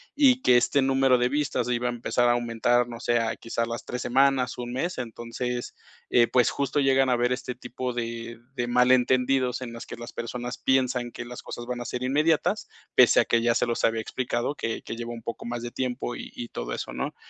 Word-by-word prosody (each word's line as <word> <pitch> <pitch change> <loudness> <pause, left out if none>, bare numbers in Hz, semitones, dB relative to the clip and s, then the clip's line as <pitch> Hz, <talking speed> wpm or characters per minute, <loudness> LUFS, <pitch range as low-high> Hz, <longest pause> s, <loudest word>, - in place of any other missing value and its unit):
y 265 -3 +5
que 125 - +6
este 130 +4 +3
número 135 -1 +4
de 125 0 +2
vistas 145 -1 0
iba 125 0 0
a - - 0
empezar 120 0 +1
a - - +5
aumentar, 120 0 +1
no 120 -1 -8
sé, 120 0 +1
a 115 -1 -1
quizás 115 0 -2
las 115 0 -5
3 125 - -4
semanas, 130 0 +2
1 120 0 -5
mes". 170 +8 -2
Entonces, 120 +1 -4 0.6
pues 125 -2 +5
justo 140 +1 -1
llegan 135 -1 +4
a - - +4
haber 120 +1 +1
este 125 -1 -5
tipo 125 +1 -5
de 115 -1 -5 0.2
de 120 -2 -1
malentendidos 125 +1 +3
en 125 -2 -5
las 115 - -8
que - - -7
las 120 +1 -8
personas 120 +1 -5
piensan 125 -2 +1
que 125 - -7
las 120 0 -8
cosas 120 - -7
van 125 -1 -3
a - - -5
ser 125 +1 -4
inmediatas, 150 +5 +1 0.3
pese - - +7
a - - -1
que 115 - +2
ya 115 0 +2
se - - +2
los 120 - -2
había 115 0 +1
explicado, 120 +3 -2
que 115 -5 -3
que - - -6
lleva 120 0 -5
un 115 -1 -9
poco 115 - -6
más 120 0 -4
de 120 - -5
tiempo 125 -1 -3
y - - -8
y 120 -1 -6
todo - - -5
eso, - - -5
¿no? - - -4
125 Hz, 225 wpm, -26 LUFS, 120-130 Hz, 0.6 s, pese